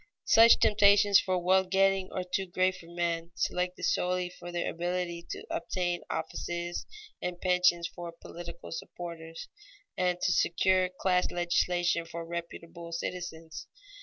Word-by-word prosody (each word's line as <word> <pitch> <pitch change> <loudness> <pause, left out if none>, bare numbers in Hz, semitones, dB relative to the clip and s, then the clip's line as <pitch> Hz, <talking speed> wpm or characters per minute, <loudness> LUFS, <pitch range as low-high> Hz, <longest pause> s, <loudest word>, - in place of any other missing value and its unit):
Such 230 +1 +7
temptations 205 -1 +6
for 185 -1 0
wealth 185 +1 +2
getting 195 0 +2
are 185 - -2
too 190 +1 -2
great 185 +1 +1
for 170 -2 -13
men 170 -1 -2
selected 180 0 -2
solely 180 0 +1
for 175 0 -9
their 175 0 -2
ability 175 0 -3
to - - -6
obtain 175 0 -2
offices 170 +2 -4 0.3
and 180 -1 -4
pensions 180 -2 +3
for 175 -1 -8
political 170 0 -10
supporters, 165 -1 -7 0.5
and 180 -1 0
to 180 - +1
secure 185 +2 +2
class 180 0 +1
legislation 175 -1 +1
for 165 0 -6
reputable 170 0 -7
citizens. 165 -2 -5
175 Hz, 135 wpm, -30 LUFS, 170-185 Hz, 0.5 s, Such